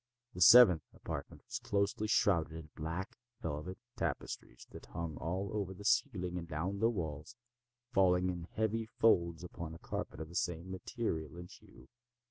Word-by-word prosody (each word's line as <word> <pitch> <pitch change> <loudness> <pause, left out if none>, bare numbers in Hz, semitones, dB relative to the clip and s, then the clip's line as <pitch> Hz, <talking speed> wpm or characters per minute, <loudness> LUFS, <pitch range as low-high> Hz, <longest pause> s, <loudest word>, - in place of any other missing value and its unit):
The 90 - -6
seventh 95 -6 +9
apartment - - -6
was - - -4
closely 100 +1 0
shrouded 90 -8 +3
in 80 -1 -8
black 80 +4 -4 0.2
velvet 75 +6 -4 0.2
tapestries - - -4
that - - -11
hung 85 -2 -4
all 95 +4 -2
over 100 -3 -2
the 100 - -11
ceiling 90 -10 +1
and 85 - -7
down 85 +5 -2
the 115 +2 +4
walls, 80 -1 -4 0.6
falling 90 -1 +4
in 85 -2 -6
heavy 110 +3 -1
folds 85 -6 +3
upon 85 -2 -6
a - - -9
carpet - - -5
of 80 0 -6
the - - -12
same 85 +1 -2
material 90 - -3
and 90 0 -9
hue. 65 - -16
90 Hz, 160 wpm, -34 LUFS, 80-100 Hz, 0.6 s, seventh